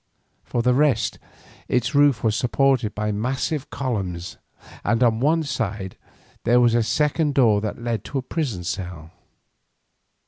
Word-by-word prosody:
For 120 Hz, -, -2 dB
the 125 Hz, 0 st, +3 dB
rest 135 Hz, -4 st, +1 dB, 0.5 s
its 125 Hz, +3 st, 0 dB
roof 145 Hz, -5 st, +4 dB
was 110 Hz, -2 st, +2 dB
supported 130 Hz, -2 st, +1 dB
by 105 Hz, 0 st, -1 dB
massive 130 Hz, +7 st, -2 dB
columns, 95 Hz, -10 st, -4 dB, 0.5 s
and 120 Hz, +1 st, +2 dB
on 115 Hz, -2 st, +3 dB
one 160 Hz, +5 st, +2 dB
side 110 Hz, -9 st, -3 dB, 0.5 s
there 120 Hz, +2 st, +4 dB
was 120 Hz, -1 st, +4 dB
a 120 Hz, -, +3 dB
second 150 Hz, +4 st, +1 dB
door 110 Hz, -6 st, +4 dB
that 105 Hz, -1 st, -3 dB
led 115 Hz, -4 st, -2 dB
to 140 Hz, -, -4 dB
a 130 Hz, -, -2 dB
prison 130 Hz, -, -3 dB
cell. 85 Hz, -3 st, -5 dB
120 Hz, 145 wpm, -23 LUFS, 105-135 Hz, 0.5 s, roof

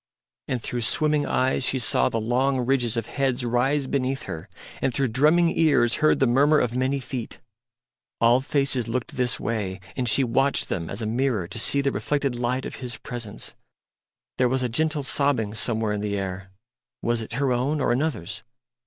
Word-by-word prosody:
And 125 Hz, -3 st, -2 dB
through 120 Hz, -, -3 dB
swimming 150 Hz, +5 st, +1 dB
eyes 130 Hz, +1 st, +1 dB
she 130 Hz, -, +1 dB
saw 120 Hz, -, +3 dB
the 115 Hz, -, -2 dB
long 125 Hz, +3 st, 0 dB
ridges 120 Hz, -3 st, +1 dB
of 115 Hz, -, -1 dB
heads 130 Hz, -1 st, -1 dB
rise 130 Hz, +4 st, +1 dB
beneath 135 Hz, 0 st, -1 dB
her, 85 Hz, +4 st, -7 dB, 0.3 s
and 130 Hz, -, +1 dB
through 135 Hz, +1 st, 0 dB
drumming 155 Hz, +8 st, +3 dB
ears 145 Hz, -7 st, +3 dB
heard 155 Hz, -, +3 dB
the 135 Hz, -, +4 dB
murmur 140 Hz, +5 st, +4 dB
of 125 Hz, -4 st, 0 dB
many 130 Hz, +2 st, 0 dB
feet. 125 Hz, -2 st, -6 dB, 0.8 s
All 120 Hz, +2 st, +4 dB
faces 135 Hz, -3 st, +1 dB
looked 125 Hz, +1 st, -3 dB
this 125 Hz, -1 st, +1 dB
way; 105 Hz, -4 st, -3 dB, 0.2 s
and 125 Hz, -3 st, 0 dB
she 135 Hz, -, +6 dB
watched 135 Hz, +3 st, +1 dB
them 85 Hz, -3 st, -3 dB
as 105 Hz, +3 st, -4 dB
a -, -, -2 dB
mirror 115 Hz, -4 st, 0 dB
to 100 Hz, +5 st, -3 dB
see 140 Hz, +5 st, +4 dB
the 140 Hz, 0 st, 0 dB
reflected 140 Hz, -2 st, -1 dB
light 120 Hz, +2 st, -2 dB
of -, -, -6 dB
His 125 Hz, -3 st, -4 dB
presence. 115 Hz, -4 st, -6 dB, 0.9 s
There 125 Hz, -1 st, +3 dB
was 130 Hz, 0 st, 0 dB
a 125 Hz, -, 0 dB
gentle 150 Hz, +3 st, 0 dB
sobbing 135 Hz, -7 st, +1 dB
somewhere 110 Hz, -1 st, -1 dB
in 105 Hz, -, -3 dB
the 105 Hz, -1 st, -2 dB
air 95 Hz, -1 st, -5 dB, 0.5 s
was 120 Hz, 0 st, 0 dB
it 110 Hz, -, -8 dB
her 135 Hz, +1 st, +1 dB
own 135 Hz, +5 st, 0 dB
or 130 Hz, -, +1 dB
another's? 120 Hz, -, -2 dB
125 Hz, 190 wpm, -24 LUFS, 115-135 Hz, 0.9 s, she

